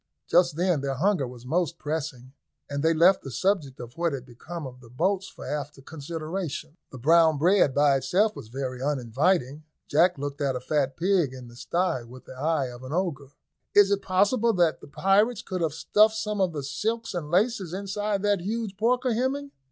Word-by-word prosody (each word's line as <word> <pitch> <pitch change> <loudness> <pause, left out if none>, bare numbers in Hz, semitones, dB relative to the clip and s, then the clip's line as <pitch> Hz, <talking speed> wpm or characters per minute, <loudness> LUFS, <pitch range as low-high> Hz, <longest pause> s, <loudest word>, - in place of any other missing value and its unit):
Just 175 -3 +3
then 175 -3 +1
their 135 -1 -2
hunger 175 -2 +1
was 120 0 -11
most 170 +4 0
pressing, 145 -5 -5 0.3
and 140 0 -3
they 160 +2 +3
left 170 +4 +5
the 135 - -8
subject 145 - -1
of 120 0 -9
what 170 -3 +1
had 130 -2 -5
become 150 +7 -8
of 125 -1 -9
the 120 -2 -16
boats 190 +9 0
for - - -11
after 145 -1 -4
consideration. 155 +2 -5
The 130 - -10
brown 160 +4 +4
bread 170 -3 +3
by 145 -1 +4
itself 200 +11 +1
was - - -9
very 130 +1 -5
uninviting. 140 +3 0 0.2
Jack 170 +4 +3
looked 145 +1 -5
at 135 -2 0
a - - -2
fat 135 0 -1
pig 175 -7 +1
in 125 -2 -10
the 120 - -15
sty 170 +1 -1
with 125 +2 -13
the - - -10
eye 145 +2 0
of 120 0 -10
an 130 +3 -6
ogre. 160 -7 -2 0.5
"Is 205 -1 +6
it 200 0 +1
possible 210 +5 +2
that 175 -4 +2
the - - -12
pirates 205 +8 +2
could 185 -2 -4
have 160 -3 0
stuffed 215 +5 +3
some 210 -2 -2
of 185 -2 +2
the 145 -3 -5
silks 220 +12 -2
and 165 -5 -4
laces 195 0 +1
inside 200 +1 -2
that 205 -2 +2
huge 210 0 -3
porker, 250 +3 +1
Hemming?" 275 +4 -1
165 Hz, 200 wpm, -26 LUFS, 135-195 Hz, 0.5 s, Is